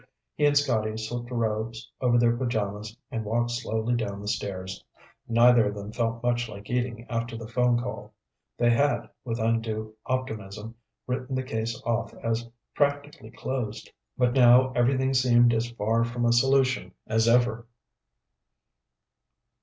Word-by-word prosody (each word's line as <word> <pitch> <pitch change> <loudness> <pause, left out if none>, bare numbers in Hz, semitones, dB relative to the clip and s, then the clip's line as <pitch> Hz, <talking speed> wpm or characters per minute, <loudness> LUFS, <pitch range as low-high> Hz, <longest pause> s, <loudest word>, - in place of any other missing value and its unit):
He 150 - +1
and 145 0 +3
Scotty 110 -6 +1
slipped 120 +2 -5
robes 115 -1 -2
over 120 -2 +3
their 120 0 +4
pajamas 110 -3 -3
and 115 -4 -3
walked 120 +3 0
slowly 120 -1 -1
down 105 -4 -2
the 105 - -8
stairs. 95 -3 -4 0.4
Neither 120 -1 +5
of 105 - -3
them 100 +1 -7
felt 115 0 -2
much 120 -1 0
like 105 +1 -9
eating 120 -1 -2
after 115 0 -3
the 115 -1 -7
phone 120 +1 +2
call. 110 -3 -6 0.5
They 120 0 +3
had, 120 -1 +2 0.2
with 115 -2 -3
undue 110 -1 -1
optimism, 110 -4 -4 0.3
written 130 +1 -3
the 130 - -1
case 110 -3 -3
off 115 -1 -1
as 115 +1 -2 0.2
practically 145 -5 -1
closed. 120 -3 -5 0.3
But 125 -1 +2
now 125 0 +6
everything 130 +2 +2
seemed 120 -2 +5
as 115 +1 0
far 115 0 0
from 120 +1 -2
a 120 - +4
solution 130 -6 +2
as 110 +1 +1
ever. 120 -1 +2
115 Hz, 145 wpm, -27 LUFS, 110-125 Hz, 0.5 s, now